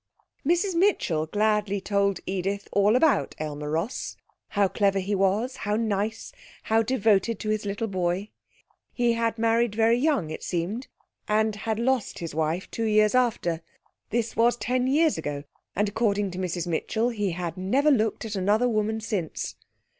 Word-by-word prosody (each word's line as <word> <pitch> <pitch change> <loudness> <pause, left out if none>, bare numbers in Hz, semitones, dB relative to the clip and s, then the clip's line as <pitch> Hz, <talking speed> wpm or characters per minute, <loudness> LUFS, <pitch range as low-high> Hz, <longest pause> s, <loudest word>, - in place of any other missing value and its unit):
Mrs 350 +5 +2
Mitchell 335 - +2
gladly 210 +1 +1
told 200 0 0
Edith 195 +2 -2
all 205 +2 +4
about 300 +3 +3
Aylmer 150 -1 -4
Ross, 165 +10 -3 0.3
how 200 -2 +2
clever 195 +1 +1
he 195 +2 -1
was, 200 +6 +1
how 205 +1 -1
nice, 215 -1 -1 0.3
how 225 +1 +3
devoted 225 -2 +2
to 215 - -3
his 215 -1 -1
little 200 +3 -2
boy. 185 0 -2 0.6
He 240 -1 +2
had 230 0 0
married 230 -1 +2
very 230 +2 +3
young, 255 - +1
it - - -6
seemed, 190 +9 -3 0.4
and 215 0 +2
had 220 +1 -2
lost 245 -1 0
his 165 -3 -5
wife 160 +4 -1
two 230 - -2
years 215 -1 +4
after. 230 -10 +1 0.5
This 230 0 -1
was 240 +1 +3
ten 250 +1 0
years 310 +3 +3
ago, 145 -1 -4 0.3
and 205 +3 +2
according 205 -2 0
to 180 - -6
Mrs 175 -2 -2
Mitchell 220 +7 0
he 205 -6 -1
had 170 -2 -4
never 260 +11 +2
looked 225 -4 +1
at 215 - -5
another 205 +6 +2
woman 220 -1 0
since. 205 -8 -3
210 Hz, 160 wpm, -26 LUFS, 190-230 Hz, 0.6 s, all